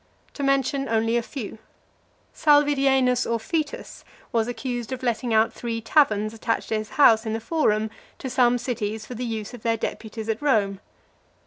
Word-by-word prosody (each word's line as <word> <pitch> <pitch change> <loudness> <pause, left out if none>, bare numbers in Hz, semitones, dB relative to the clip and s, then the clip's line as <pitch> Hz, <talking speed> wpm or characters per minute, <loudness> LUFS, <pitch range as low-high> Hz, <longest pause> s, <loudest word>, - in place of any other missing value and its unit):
To - - -7
mention 275 0 +1
only 225 +1 +1
a 240 - +2
few: 230 -3 -7 0.7
Salvidienus 275 -4 +3
Orfitus 305 - -3 0.3
was 225 -1 +1
accused 245 -1 -4
of 260 0 -5
letting 240 0 -1
(367) - - 0
out 220 - +1
three 230 -1 -4
taverns 220 -4 +2
attached 230 +1 -2
to 220 - +1
his 215 - -7
house 225 -6 +6
in 220 - -1
the 225 - -1
Forum 220 -5 0 0.3
to - - -6
some 245 -1 +3
cities 220 -3 -3
for 250 - -8
the 245 +1 -5
use 220 -2 -4
of 245 - -9
their 230 0 +1
deputies 220 0 -5
at 225 +2 -2
Rome. 205 -9 +1
235 Hz, 175 wpm, -24 LUFS, 220-265 Hz, 0.7 s, house